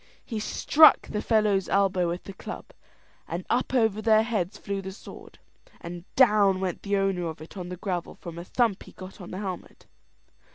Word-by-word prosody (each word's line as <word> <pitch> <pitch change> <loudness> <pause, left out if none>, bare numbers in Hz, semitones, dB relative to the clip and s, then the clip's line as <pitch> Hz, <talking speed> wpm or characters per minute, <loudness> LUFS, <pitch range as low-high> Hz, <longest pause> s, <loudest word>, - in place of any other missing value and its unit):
He 225 -3 -4
struck 310 +8 +5
the 210 - -2
fellow's 210 -4 +2
elbow 190 -3 +2
with 175 +1 -4
the 195 - -9
club, - - -8 0.6
and 175 +2 -4
up 250 +2 +1
over 220 -3 +2
their 220 0 +4
heads 210 -4 -2
flew 200 -1 -4
the 190 0 -6
sword, 190 - -12 0.4
and 175 0 -8
down 210 -7 +5
went 185 -2 -3
the 200 0 0
owner 195 -3 0
of 160 -2 -6
it 155 +5 -12
on 180 -2 -6
the 180 - -6
gravel 180 -2 -4
from 170 -1 -9
a - - -6
thump 225 +1 0
he - - -13
got 185 +1 -11
on 180 - -9
the 185 - -6
helmet. 190 -3 -7
195 Hz, 195 wpm, -26 LUFS, 180-215 Hz, 0.6 s, struck